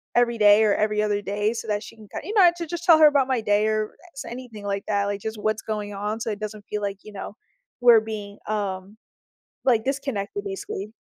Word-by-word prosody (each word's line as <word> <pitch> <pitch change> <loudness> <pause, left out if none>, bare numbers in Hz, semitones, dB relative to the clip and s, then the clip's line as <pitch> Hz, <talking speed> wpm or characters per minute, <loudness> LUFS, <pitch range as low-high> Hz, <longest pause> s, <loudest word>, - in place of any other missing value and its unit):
every 235 -1 +3
day 210 0 +6
or 210 -2 +4
every 210 0 +1
other 205 -1 0
day 205 +1 -1
so 235 - -6
that 210 0 -1
she - - -11
can 215 -1 -14
kin - - -6
you 415 - -4
know, 375 -4 +8
to 340 - -4
just 345 +1 -5
tell 330 -2 +8
her 310 - +9
about 280 -3 +3
my 260 -3 0
day 210 0 +2
or 215 0 -1 0.2
s 275 - -7
anything 235 -4 -8
like 200 0 -2
that, 200 -1 +1
like, 200 0 -2
just 220 +1 -5
what's 215 +1 -1
going 210 -1 -4
on, 210 +2 -3
so 225 - -2
it 210 - -5
doesn't 215 -1 -6
feel 210 - -2
like, 200 -1 -3
you 215 - -11
know, 200 +1 -7 0.5
we're 240 -2 +8
being, 210 -2 -7
um, 200 -1 -3 0.7
like, 235 -4 +3
disconnected, 255 -8 -3
basically. 195 +1 -5
215 Hz, 235 wpm, -24 LUFS, 205-235 Hz, 0.7 s, her